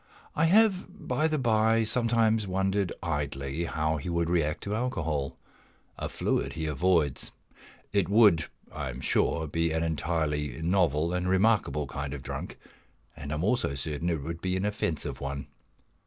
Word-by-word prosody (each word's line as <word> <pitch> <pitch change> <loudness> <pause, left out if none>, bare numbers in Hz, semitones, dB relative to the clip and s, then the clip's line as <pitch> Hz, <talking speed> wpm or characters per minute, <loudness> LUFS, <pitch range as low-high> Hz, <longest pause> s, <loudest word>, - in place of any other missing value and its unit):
I 160 - +3
have, 195 +1 +4 0.2
by 155 - +2
the 155 -1 0
bye, 115 -3 +3
sometimes 115 -2 +2
wondered 95 0 0
idly 75 -1 -2
how 80 -1 0
he 75 - -5
would 85 0 0
react 75 -3 0
to 100 - -3
alcohol 80 - -2 0.6
a - - -4
fluid - - -1
he 80 -1 -3
avoids. 80 -1 +1 0.6
It 100 -4 +2
would, 100 -6 +5 0.3
I 65 - -4
am 65 0 -6
sure, 80 +4 +1
be 80 +2 0
an 80 +1 0
entirely 75 -4 -1
novel 85 -2 +2
and 90 0 0
remarkable 95 -6 +2
kind 70 +1 -4
of 65 - -8
Drunk, - - -6 0.6
and 75 -2 -7
I - - 0
am 75 - -2
also 105 - +1
certain 75 +4 -2
it 80 -5 -1
would 85 +2 -5
be 95 0 0
an 95 - -1
offensive 95 -7 -2
one. 70 0 -4
85 Hz, 160 wpm, -28 LUFS, 75-105 Hz, 0.6 s, would